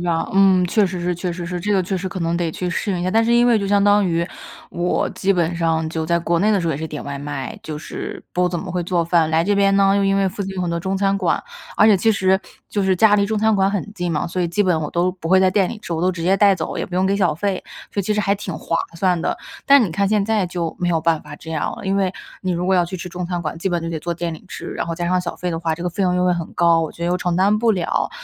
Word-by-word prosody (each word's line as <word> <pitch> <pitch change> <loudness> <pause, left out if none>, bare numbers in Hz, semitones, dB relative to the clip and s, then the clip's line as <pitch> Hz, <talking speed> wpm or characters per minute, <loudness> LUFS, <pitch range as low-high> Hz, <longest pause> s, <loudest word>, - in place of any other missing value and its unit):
吧。 170 -2 -1
嗯， 190 -2 +5
确 210 +3 +3
实 180 -1 -3
是 175 +1 -1
确 175 +1 -3
实 170 0 -6
是， 180 0 -4
这 205 +3 -1
个 190 - +3
确 190 +2 -2
实 190 +1 -3
可 185 0 -6
能 170 0 0
得 170 -2 -1
去 180 +3 -4
适 200 +4 -2
应 180 - -1
一 - - -2
下， 185 - 0
但 225 +2 +3
是 235 - +2
因 240 +1 +5
为 235 -2 +4
就 200 - -2
相 200 0 +3
当 205 0 +4
于 170 0 0 0.4
我 175 +1 0
基 190 +1 0
本 175 -2 0
上 160 -1 0
就 160 0 -3
在 170 +1 +1
国 170 0 0
内 210 - +3
的 205 -3 +2
时 170 - -2
候 160 - +1
也 - - -3
是 160 +2 -4
点 150 - -6
外 140 0 -5
卖， 140 -2 -5
就 155 -1 -6
是 - - -7
不 180 0 +1
怎 175 - -3
么 185 +2 -6
会 180 - -1
做 170 -1 0
饭。 165 -2 +2
来 160 +1 +2
这 205 +2 +2
边 195 0 +3
呢， 195 0 +4
又 200 - +2
因 195 0 +2
为 195 -1 +2
附 200 +2 -5
近 195 0 -5
有 - - -2
很 175 - -1
多 170 0 -1
中 190 +2 -2
餐 195 0 +1
馆， 185 -3 0 0.3
而 215 - +6
且 210 -3 +6
其 225 +5 +2
实 190 -2 +2 0.3
就 205 - -1
是 190 -1 +2
家 215 +2 +5
离 200 -1 +3
中 215 +1 -1
餐 220 0 +3
馆 195 0 +2
很 205 +1 -3
近 175 -3 -2
嘛， 150 - -1
所 180 +1 -2
以 170 - 0
基 205 +5 +1
本 180 -4 +2
我 150 - -4
都 175 +1 +1
不 170 -3 -7
会 190 - +5
在 190 - +4
店 190 -1 +2
里 220 - -6
吃， 175 - -6
我 165 +1 -2
都 185 - +3
直 170 -2 -6
接 190 +3 +3
带 200 -1 +5
走， 165 - -4
也 - - -2
不 180 - -8
用 190 +1 +2
给 200 +1 +1
小 185 -5 +2
费， 190 +3 -2 0.3
所 200 - 0
以 - - -2
其 215 - 0
实 210 - +1
还 200 0 +1
挺 200 -3 -6
划 165 +1 -2 0.2
算 180 -1 +1
的。 - - -1 0.3
但 280 -1 +6
你 200 - -1
看 200 +5 0
现 210 -1 +2
在 215 -2 +1
就 170 -2 -4
没 175 - 0
有 165 -2 +1
办 165 -1 +1
法 145 -1 -10
这 160 0 -8
样 155 - -2
了， - - -9
因 195 +1 +1
为 190 -1 +1 0.3
你 185 - -1
如 180 0 -1
果 190 - +3
要 175 -1 +3
去 185 +2 -6
吃 180 - -7
中 180 0 -5
餐 175 0 -3
馆， 155 -1 -4
基 190 - -1
本 175 -1 -1
就 165 - -4
得 165 -1 -3
坐 170 +2 -2
店 170 -1 -3
里 - - -13
吃， - - -7
然 - - -3
后 165 - -3
加 175 +1 -3
上 180 0 +2
小 180 - -5
费 180 - -3
的 165 - -2
话， 165 -1 0
这 170 - -8
个 180 - -1
费 195 +3 -3
用 180 -1 +2
又 180 0 +1
会 180 -1 +3
很 170 -2 -5
高， 170 -1 +4
我 160 - -3
觉 170 - -9
得 - - 0
又 180 +1 +1
承 180 -1 -1
担 200 +3 +3
不 225 +1 +2
了。 185 - 0
180 Hz, 360 characters per minute, -20 LUFS, 170-195 Hz, 0.4 s, 而